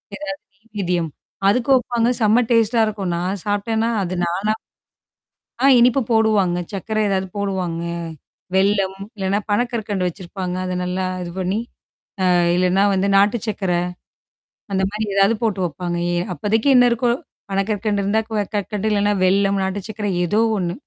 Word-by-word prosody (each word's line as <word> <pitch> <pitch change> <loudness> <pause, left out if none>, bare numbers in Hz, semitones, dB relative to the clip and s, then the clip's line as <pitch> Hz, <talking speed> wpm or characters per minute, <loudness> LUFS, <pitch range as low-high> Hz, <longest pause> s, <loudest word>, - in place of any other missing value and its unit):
எதாவது 295 -1 -5
நெய் 215 +4 -31
வேதியம். 175 -3 0 0.4
அதுக்கு 250 +5 +1
வைப்பாங்க. 240 -2 +1
செம்ம 220 +3 +4
டேஸ்ட்டா 230 0 +3
இருக்கும் 200 -4 -3
நான் 185 +2 -2
சாப்டேன்னா, 220 +3 0
அது 185 +1 -3
நானா 195 +5 0 1.1
ஆ - - +7
இனிப்பு 250 +2 +4
போடுவாங்க. 210 -5 +3
சர்க்கர 215 +3 -3
ஏதாவது 190 -1 -1
போடுவாங்க. 185 -4 -2 0.7
வெள்ளம் 195 -1 +2 0.2
இல்லன்னா 195 +1 0
பனக்கற்கண்டு 210 -4 0
வச்சிருப்பாங்க. 180 0 -5
அத 185 - -3
நல்லா 185 +1 -2 0.2
இது 175 - -5
பண்ணி, 190 +3 -1 0.7
அ - - +4 0.2
இல்லன்னா 185 +2 +3
வந்து 195 +1 +1
நாட்டு 205 +4 +4
சர்க்கர. 195 -3 -1 1.0
அந்தமாரி 195 +3 -1
ஏதாவது 200 +3 +4
போட்டு 210 -4 0
வைப்பாங்க. 175 +1 -4 0.2
ஏ - - +1 0.2
அப்போதைக்கு 220 +7 +1
என்ன 245 0 +6
இருக்கோ, 235 +1 +1 0.4
பனக்கற்கண்டு 205 +1 0
இருந்தா 220 +3 +1
க 210 -2 0
கற்கண்டு 205 +1 -2
இல்லன்னா 205 0 +2
வெல்லம் 195 +1 +2
நாட்டு 190 +1 -3
சக்கர 210 -1 -3 0.2
ஏதோ 215 +6 +2 0.2
ஒண்ணு. 175 +1 -2
200 Hz, 140 wpm, -20 LUFS, 190-220 Hz, 1.1 s, ஆ